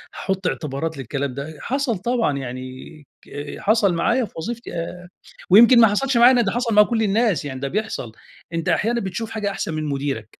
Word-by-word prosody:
هاحُط 190 -1 -2
اعتبارات 150 +1 -3
للكلام 135 +1 -3
ده؟ 145 +4 -7
حصل 265 -4 -1
طبعًا 225 - 0
يعني 130 -1 -5 0.6
ك 145 0 -7
حصل 205 -3 +2
معايا 200 +9 +1
في - - -16
وظيفتي 235 +8 -6
أ 175 +1 -6 0.4
ويمكن 235 +6 +8
ما 225 - +8
حصلش 260 +5 0
معايا 240 +2 +8
أنا، 245 - +4
ده 205 -4 0
حصل 240 0 -1
مع 210 0 +7
كل 225 0 -1
الناس، 210 -5 +1
يعني 130 -2 -5
ده 140 - -3
بيحصل. 190 - -3 0.4
أنت 165 -1 -2
أحيانًا 235 +2 +1
بتشوف 195 +4 -4
حاجة 210 -2 -2
أحسن 180 -4 -4
من 155 0 -3
مُديرك. 135 -6 -4
195 Hz, 190 wpm, -21 LUFS, 145-230 Hz, 0.6 s, ويمكن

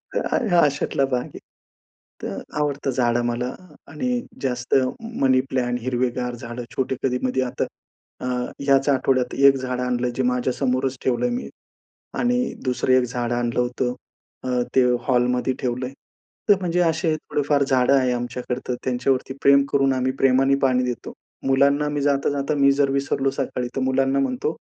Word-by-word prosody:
हं, - - 0 0.2
हां 175 -1 +6
अशातला 140 -1 0
भाग 125 -2 -1
आहे. - - -11 0.8
तर - - -4 0.2
आवडतं 140 -2 -1
झाडं 120 -2 +1
मला 120 +1 -2 0.3
आणि 245 +11 -2 0.2
जास्त 125 -2 -1 0.5
मनी 130 -1 +4
प्लांट 125 -1 -1
हिरवेगार 125 0 -1
झाडं 120 +1 -7
छोटे 130 0 -1
कधी-मधी 130 0 0
आता 125 -1 -1 0.6
अ, 125 - -3 0.4
याच 135 +1 +4
आठवड्यात 130 -2 +1
1 140 0 +6
झाडं 125 -1 -3
आणलं. 125 0 0
जे 130 - 0
माझ्या 125 0 0
समोरच 130 0 -1
ठेवलंय 130 - +1
मी 250 - -5 0.7
आणि 245 +1 +1
2सरं 130 0 0
एक 130 0 +5
झाडं 120 0 -2
आणलं 120 0 -1
होतं 125 0 -1 0.5
अ, 125 -1 0
ते 130 - +6 0.2
हॉलमध्ये 125 0 +2
ठेवलंय. 125 0 -2 0.6
तर 205 - +8
म्हणजे 180 -1 -1
असे 160 -1 +1
थोडेफार 145 -1 0
झाडं 130 -1 +3
आहे 130 -2 +3
आमच्याकडे 120 +1 -3
तर 125 - -1
त्यांच्यावरती 130 +1 0
प्रेम 140 0 +6
करून 135 -1 +3
आम्ही 130 0 0
प्रेमाने 135 +1 +4
पाणी 130 -1 +3
देतो. 125 -1 -4 0.3
मुलांना 140 +2 +3
मी 145 -1 -2
जाता-जाता 140 0 0
मी 140 -1 +5
जर 140 0 +2
विसरलो 135 0 0
सकाळी 125 -2 -3
तर 135 - -1
मुलांना 135 +1 +1
म्हणतो, 135 +3 -1
130 Hz, 155 wpm, -23 LUFS, 125-140 Hz, 0.8 s, तर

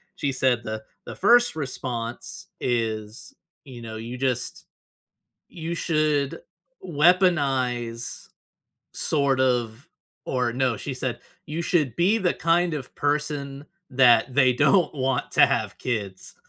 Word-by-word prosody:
She 140 - -1
said 130 -2 +1
the 110 -1 -5 0.2
the - - -8
1st 240 -4 +4
response 130 +6 -5
is, 115 - -3 0.3
you 125 -4 -10
know, 110 -1 -7
you 115 +3 -6
just 125 -2 -2 0.9
you 170 0 -4
should 155 -2 0 0.5
weaponize, 140 -9 +1 0.6
sort 140 -3 0
of 125 +2 0 0.4
or, 125 -2 0
no, 125 -2 0
she 135 +5 -5
said, 125 -2 -4 0.3
"You 155 +3 -4
should 150 - 0
be 190 +6 +3
the 185 -4 +1
kind 170 0 +1
of 135 -4 -7
person 145 -1 -2 0.2
that 125 -1 +4
they 130 -2 +5
don't 180 +8 +3
want 130 -2 -1
to - - +7
have - - -2
kids," 100 -6 -4
130 Hz, 125 wpm, -24 LUFS, 120-155 Hz, 0.9 s, to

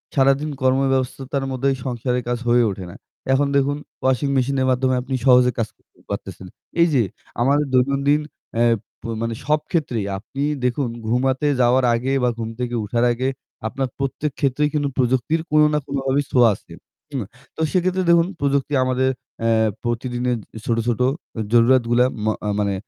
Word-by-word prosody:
সারাদিন 135 +2 +3
কর্মব্যবস্থার 135 +1 0
মধ্যে 130 +1 -1
এই - - -5
সংসারের 125 0 -1
কাজ 120 0 0
হয়ে 120 0 +5
ওঠে 95 -1 -7
না। - - -12 0.4
এখন 140 +2 +3
দেখুন 140 +1 +1 0.2
ওয়াশিং 130 +2 +1
মেশিন 130 +2 +1
এর 130 - +2
মাধ্যমে 130 0 +1
আপনি 130 +1 -3
সহজে 125 -1 +6
কাজ 115 - 0
করতে - - -30
পারতেছেন। 95 - -6 0.3
এই 170 - +6
যে 130 - +4 0.4
আমাদের 140 +4 +3
দৈনন্দিন 140 +3 +3 0.3
অ্যা 120 +1 +3 0.6
মানে 115 0 -1
সব 150 +1 +3
ক্ষেত্রেই 125 - 0
আপনি 125 +7 -7 0.2
দেখুন 125 +2 0 0.2
ঘুমাতে 130 +4 +1
যাওয়ার 125 +1 +4
আগে 125 +3 -1
বা 125 - +4
ঘুম 115 -1 -4
থেকে 120 -1 -2
উঠার 115 +3 +1
আগে। 130 +2 -2 0.4
আপনার 135 +4 -2
প্রত্যেক 135 +2 -2
ক্ষেত্রেই 145 +2 +1
কিন্তু 145 -2 0
প্রযুক্তির 130 +5 +1
কোন 155 0 +5
না 150 - +2
কোনভাবেই 140 0 0
ছোয়া 125 -2 +6
আছে। - - -19 0.4
হুম, 135 -5 -2 0.3
তো - - -5
সেক্ষেত্রে 185 0 +1
দেখুন 170 0 +5
প্রযুক্তি 140 0 0
আমাদের 130 +1 +1 0.3
এ্যা 110 -1 +3
প্রতিদিনের 120 +1 -1 0.3
ছোট, 115 - +1
ছোট, 120 0 0 0.5
জরুরাতগুলা 120 0 +4 0.2
ম - - 0 0.3
মানে 100 -1 +1
130 Hz, 160 wpm, -21 LUFS, 120-140 Hz, 0.6 s, সহজে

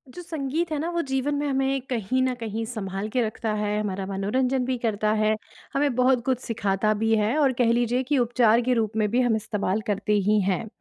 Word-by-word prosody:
जो 355 - -6
संगीत 320 0 -3
है 305 - 0
ना 325 +3 -2
वो 340 0 0
जीवन 270 +2 0
में 290 +1 -1
हमें 270 0 0
कहीं 250 +1 0
न 255 - +1
कहीं 225 -1 -4
सँभाल 200 -3 -4
के 255 - +1
रखता 220 -1 -2
है 210 0 -1
हमारा 195 -2 -3
मनोरंजन 250 +7 0
भी 255 0 -1
करता 215 -2 0
है 215 0 +3 0.4
हमें 275 -2 +1
बहुत 250 -1 +3
कुछ 260 -2 +1
सिखाता 215 -3 0
भी 225 0 +3
है 215 +4 +1
और 280 -4 +3
कह 240 -2 +2
लीजिए 240 +2 +1
कि 280 +2 0
उपचार 240 -1 +3
के 250 +1 +1
रूप 220 -2 -1
में 215 -1 +2
भी 245 +2 +3
हम 240 -3 +2
इस्तेमाल 210 -1 -1
करते 210 +1 0 0.2
ही 215 0 +4
हैं। 195 +3 -1
235 Hz, 220 wpm, -25 LUFS, 215-260 Hz, 0.4 s, ही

